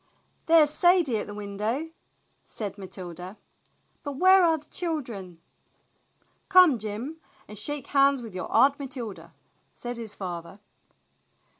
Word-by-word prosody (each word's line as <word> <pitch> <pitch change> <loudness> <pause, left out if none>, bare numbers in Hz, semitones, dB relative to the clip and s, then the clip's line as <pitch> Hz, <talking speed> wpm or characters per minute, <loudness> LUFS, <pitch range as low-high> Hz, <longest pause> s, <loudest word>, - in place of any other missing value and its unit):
"There's 320 -3 +6
Sadie 350 -7 +3
at 210 - -4
the 205 - -8
window," 210 +9 -3 0.6
said 205 -3 -6
Matilda, 185 -1 -9 0.6
"But 285 - -5
where 370 +6 +6
are 325 -2 +4
the 300 - -15
children?" 240 - -4 1.1
"Come, 365 - +6
Jim, 220 +9 -5 0.3
and 210 - -10
shake 280 +8 0
hands 275 -1 +3
with 225 -5 -9
your 185 - -6
Aunt 280 +2 +4
Matilda," 225 -11 -7 0.4
said 240 0 -6
his 225 -3 -6
father. 175 0 -7
240 Hz, 125 wpm, -26 LUFS, 200-295 Hz, 1.1 s, There's